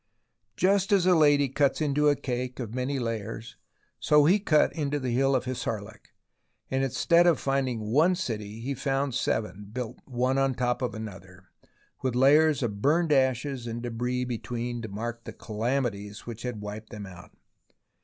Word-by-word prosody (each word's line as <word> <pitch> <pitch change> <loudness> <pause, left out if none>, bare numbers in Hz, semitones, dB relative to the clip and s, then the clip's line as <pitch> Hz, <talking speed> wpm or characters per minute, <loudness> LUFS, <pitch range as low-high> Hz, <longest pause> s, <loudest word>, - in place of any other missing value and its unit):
Just 195 - +2
as 195 -3 +4
a 185 - +5
lady 145 -3 +5
cuts 140 +1 +1
into 150 -1 +2
a 145 - +3
cake 125 -1 -4
of 115 -3 -5
many 130 +2 -1
layers, 115 -2 -4 0.4
so 150 -1 +4
he 185 +7 +5
cut 155 -6 +3
into 145 -2 -1
the 130 -2 -2
Hill 135 +3 +2
of 130 - 0
Hissarlik, 110 -5 -5 0.6
and 130 0 +1
instead 170 +6 +3
of 165 -6 +4
finding 135 -4 -1
one 165 +8 +4
city 110 - -4
he 135 +4 -2
found 135 0 -1
seven, 105 -3 -2
built 125 0 -5
one 130 +1 0
on 135 -1 +1
top 125 0 0
of 125 -2 -2
another, 95 -4 -10 0.5
with 130 -2 -1
layers 145 +2 +5
of 105 -4 -3
burned 160 +4 +2
ashes 130 -2 +1
and 115 +1 -5
debris 125 +1 -2
between 120 0 -4
to 110 - -6
mark 115 +4 -5
the - - -8
calamities 110 -2 -3
which 115 -1 -7
had 120 -4 -4
wiped 105 +1 -7
them 105 -3 -7
out. 90 -3 -13
125 Hz, 170 wpm, -27 LUFS, 115-140 Hz, 0.6 s, a